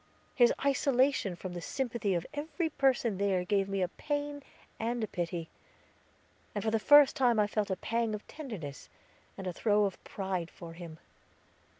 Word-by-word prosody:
His 240 -2 +5
isolation 265 -7 +2
from 180 +1 -7
the 175 - -5
sympathy 235 -4 -1
of 170 - -1
every 310 +3 -2
person 250 -8 +2
there 190 -3 +1
gave 200 0 +1
me 195 -1 0
a - - +1
pain 290 - -3 0.4
and 235 +1 -1
a - - -1
pity, 170 -3 -4 1.0
and 205 - -2
for 220 - +1
the 225 - +2
first 290 +3 +7
time 245 -4 +3
I 210 - +5
felt 210 0 -1
a 190 - 0
pang 230 +2 -1
of 210 - -9
tenderness, 205 - -7 0.5
and 195 - -6
a 180 - -2
throe 210 +2 +3
of 195 - -4
pride 190 -4 -3
for 165 -1 -10
him. 165 -2 -9
210 Hz, 175 wpm, -31 LUFS, 185-260 Hz, 1.0 s, first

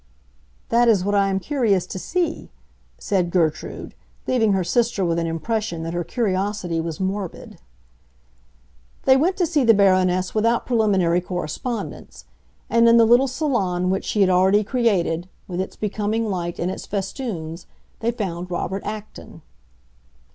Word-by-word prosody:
"That 240 +1 +4
is 200 -5 +3
what 205 - 0
I 200 -1 +3
am 190 0 0
curious 215 - +1
to 185 - -6
see," 345 - -2 0.5
said 185 -4 0
Gertrude, 165 -4 -1 0.3
leaving 225 -5 +2
her 190 -1 +1
sister 225 +1 +1
with 170 0 0
an 165 - -1
impression 170 +1 -2
that 165 +1 -4
her 175 0 -1
curiosity 190 -4 -1
was 160 -1 -5
morbid. 190 -1 -4 1.4
They 265 - +6
went 340 +8 +2
to 360 - +2
see 310 -4 +1
the 230 -2 +6
Baroness 185 -2 +3
without 230 +2 +1
preliminary 195 -7 +2
correspondence; 180 +7 -5 0.4
and 230 0 +4
in 230 - +6
the 230 - +6
little 240 +4 +5
salon 200 - 0
which 190 - -1
she 210 - 0
had 190 - +5
already 190 +3 +4
created, 195 -7 0 0.2
with 180 0 -3
its 190 - -6
becoming 215 +2 -2
light 175 -2 -3
and 180 +2 -1
its - - -7
festoons, 190 - -5 0.3
they 230 - 0
found 185 -7 -4
Robert 190 +2 -3
Acton. 215 0 -8
195 Hz, 150 wpm, -22 LUFS, 180-230 Hz, 1.4 s, They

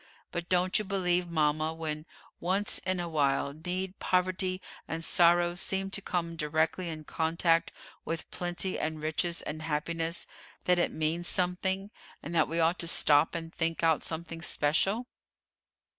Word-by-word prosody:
But 170 0 -4
don't 185 +2 +3
you - - -1
believe, 180 -3 +1
mama, 155 0 +1
when, 155 -1 -4 0.3
once 190 +4 0
in 185 -1 +1
a 175 - -2
while, 140 -3 +1
need, 180 +5 -4
poverty, 185 0 +1 0.3
and 165 0 -3
sorrow 175 0 +5
seem 190 +2 -1
to 195 - -1
come 170 -3 -2
directly 160 +3 0
in 155 -1 -6
contact 165 +2 +1 0.3
with 165 0 -4
plenty 175 +1 -1
and 155 0 -2
riches 160 +3 -1
and 155 +1 -5
happiness, 165 +2 -2 0.4
that 180 -1 +4
it - - +2
means 160 +3 -1
something, 190 +2 -1 0.3
and 165 - -6
that 160 -2 +3
we 165 +1 -1
ought 165 +2 +3
to 170 - 0
stop 150 0 +5
and 165 -1 -5
think 165 0 -1
out 160 -2 +3
something 165 0 -5
special?" 180 +9 +1
170 Hz, 155 wpm, -30 LUFS, 160-180 Hz, 0.4 s, sorrow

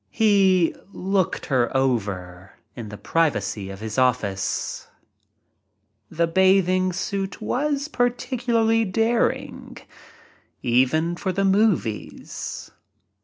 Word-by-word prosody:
He 195 -5 +3 0.2
"looked 190 -1 -1
her 125 -5 +1
over" 100 -8 -2 0.2
in 115 -4 -7
the 105 - -8
privacy 105 - -1
of 95 +1 -9
his 110 +3 -3
office. 110 -7 -1 1.2
The 170 +1 +1
bathing 185 +1 +3
suit 195 +1 -3
was 280 +6 -1
particularly 240 -3 +1
daring 225 +4 -1 0.5
— - - -30 0.2
even 130 +7 +2
for 190 - -2
the 195 +2 0
movies. 195 - -1
180 Hz, 95 wpm, -23 LUFS, -, 1.2 s, He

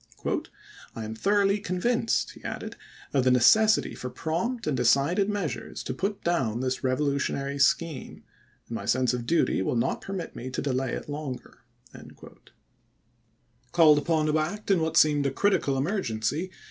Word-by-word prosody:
" - - -21
I 115 - -5
am 110 - -5
thoroughly 200 - +2
convinced," 225 +5 0
he - - -16
added, - - -6 0.2
" - - -21
of 135 -3 +3
the 130 - +3
necessity 215 - +4
for 125 - -6
prompt 200 - -3
and 150 - 0
decided 140 - +2
measures 200 -7 -4
to 130 - -4
put 195 +8 -3
down 130 -10 0
this 130 +1 -2
revolutionary 140 +1 -1
scheme, 155 0 0 0.4
and - - -8
my - - -5
sense 125 0 +2
of 120 -1 -4
duty 170 - +2
will 95 - -1
not 115 - 0
permit 195 -3 -6
me 130 - -6
to 130 - -4
delay 135 -2 -1
it - - -5
longer." 145 -3 -6 2.1
Called 155 -3 +6
upon 155 0 +1
to 155 0 +2
act 200 +7 -2
in 185 -4 +3
what 160 0 0
seemed 145 -2 +4
a - - -1
critical 140 -4 +1
emergency. 145 - -1
150 Hz, 160 wpm, -27 LUFS, 130-185 Hz, 2.1 s, Called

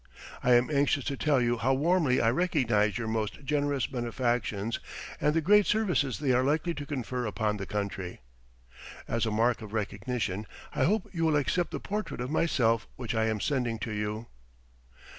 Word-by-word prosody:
I 125 - +4
am 120 +4 +3
anxious 140 -1 +2
to 140 - -2
tell 145 -1 +2
you 120 -1 +1
how 130 +3 +2
warmly 155 -2 +2
I 115 - +3
recognize 120 - +2
your 115 -2 -3
most 110 +4 -3
generous 145 -2 +1
benefactions 120 -4 -1 0.4
and 150 +1 +2
the 165 - +3
great 205 +4 +5
services 180 - +1
they 140 -3 0
are 125 +1 +3
likely 155 +5 +1
to 145 -3 -7
confer 125 -4 -3
upon 105 -1 -1
the 95 - -5
country. 100 - -4 0.9
As 115 0 0
a - - -1
mark 115 +3 +2
of 105 -1 -9
recognition, 105 -1 -2 0.3
I - - +2
hope 210 +3 +1
you 165 -2 -1
will 160 -2 +3
accept 150 +4 +1
the - - -4
portrait 210 -6 -4
of 125 +3 -3
myself 115 -9 +2
which 125 -3 -4
I 110 -1 +2
am 110 -1 0
sending 125 -3 0
to 115 0 -5
you. 105 +1 -3
125 Hz, 180 wpm, -29 LUFS, 110-150 Hz, 0.9 s, great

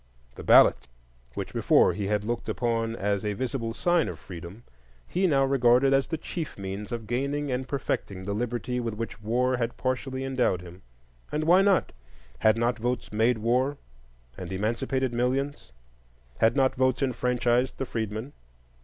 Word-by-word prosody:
The - - -9
ballot, - - +6 0.5
which - - -5
before - - +4
he 100 -2 -3
had 105 0 0
looked 120 +2 -3
upon 115 -1 -1
as 100 -1 -1
a 105 -1 -1
visible 120 +1 -3
sign 175 +4 +1
of 85 - -6
freedom, 90 +6 -10 0.4
he 185 +1 +1
now 135 -4 +3
regarded 135 0 +4
as 135 0 +2
the 160 - -2
chief 160 0 -6
means 100 +3 -6
of 115 -2 -4
gaining 140 +5 -2
and 130 +1 -2
perfecting 100 -8 -3
the 100 - -2
liberty 120 +2 -2
with 115 -3 -3
which 115 +1 -6
war 125 +4 +1
had 115 -1 -2
partially 130 +1 -2
endowed 130 -9 0
him. 90 +1 -12 0.5
And 150 +1 -1
why 175 +4 +6
not? 195 -1 +3 0.5
Had 110 +1 +4
not 120 +1 0
votes 125 +1 -2
made 115 +3 +3
war 125 +6 +1 0.6
and 90 +5 -7
emancipated 120 +6 -1
millions? 130 - -1 0.7
Had 110 +1 +4
not 135 -2 +3
votes 130 +1 +1
enfranchised 125 0 +1
the 135 - -2
freedmen? 110 +2 -4
120 Hz, 160 wpm, -27 LUFS, 110-135 Hz, 0.7 s, ballot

